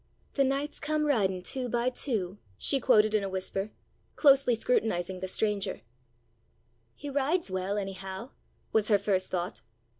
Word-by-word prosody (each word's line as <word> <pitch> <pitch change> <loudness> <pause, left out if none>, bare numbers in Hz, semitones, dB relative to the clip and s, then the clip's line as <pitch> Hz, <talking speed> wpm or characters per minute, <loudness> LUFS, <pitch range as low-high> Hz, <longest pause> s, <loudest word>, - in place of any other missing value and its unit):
"'The 275 - +3
knights 275 +2 -1
come 305 0 0
riding 195 -10 +1
two 255 +3 -2
by 240 +1 0
two,'" 210 -7 -1 0.2
she 275 - +2
quoted 215 -3 +4
in 215 -2 +2
a 195 - -2
whisper, 190 +2 -3 0.5
closely 275 -4 +5
scrutinizing 190 -6 0
the 190 - -4
stranger. 205 +1 -1 1.1
"He 290 - -8
rides 285 - 0
well, 190 +2 -1
anyhow," 195 +3 -5 0.4
was 215 -1 +3
her 210 - +5
first 195 -2 0
thought. 180 -1 -3
215 Hz, 145 wpm, -29 LUFS, 190-270 Hz, 1.1 s, closely